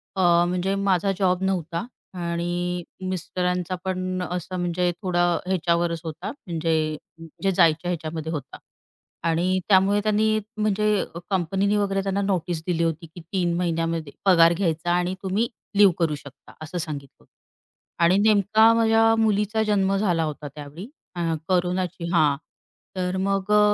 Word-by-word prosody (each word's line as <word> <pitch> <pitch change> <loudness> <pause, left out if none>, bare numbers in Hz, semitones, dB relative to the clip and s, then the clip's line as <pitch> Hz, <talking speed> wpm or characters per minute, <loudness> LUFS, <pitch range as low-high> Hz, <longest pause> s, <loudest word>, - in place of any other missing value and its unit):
अ, 190 - 0 0.3
म्हणजे 180 +2 -1
माझा 195 0 +2
जॉब 185 -1 +2
नव्हता 180 +1 -1 0.3
आणि 175 +1 -2 0.3
मिस्टरांचा 180 0 -2
पण 185 0 -2
असं 180 +1 -4
म्हणजे 175 0 0
थोडा 175 -2 +1 0.2
ह्याच्यावरच 170 -2 0
होता 165 +3 -5
म्हणजे 165 - -3 0.7
जे 195 - +3
जायच्या 165 0 +3
ह्याच्यामध्ये 160 -1 -4
होता. 140 -5 -6 0.7
आणि 180 +3 +1
त्यामुळे 200 +1 +4
त्यांनी 215 0 +2 0.2
म्हणजे 210 -1 +1 0.3
कंपनीने 195 +3 +1
वगैरे 195 -1 0
त्यांना 195 +1 -1
नोटीस 180 -4 -1
दिली 170 -2 +1
होती 165 0 -2
की, 170 +2 -12
"3 175 +1 -1
महिन्यामध्ये 165 -3 -1
पगार 170 -3 +6
घ्यायचा 170 -2 -1
आणि 180 +1 0
तुम्ही 200 +5 0 0.3
लिव्ह 200 -3 +7
करू 160 -3 +1
शकता." 140 -1 -14
असं 155 +3 -6
सांगितलं 150 -5 -5
होतं. - - -31 0.7
आणि 175 +3 +5
नेमका 215 +2 +5
माझ्या 225 0 +4
मुलीचा 215 0 +1
जन्म 195 -2 +1
झाला 175 -5 +1
होता 150 -1 -4
त्यावेळी. 150 - -9 0.3
आ 170 -1 -1
कोरोनाची 180 -1 -1
हां, 150 -4 +4 0.6
तर 180 0 -1
मग 195 +1 -1
अ, 210 - +6
180 Hz, 140 wpm, -24 LUFS, 170-195 Hz, 0.7 s, लिव्ह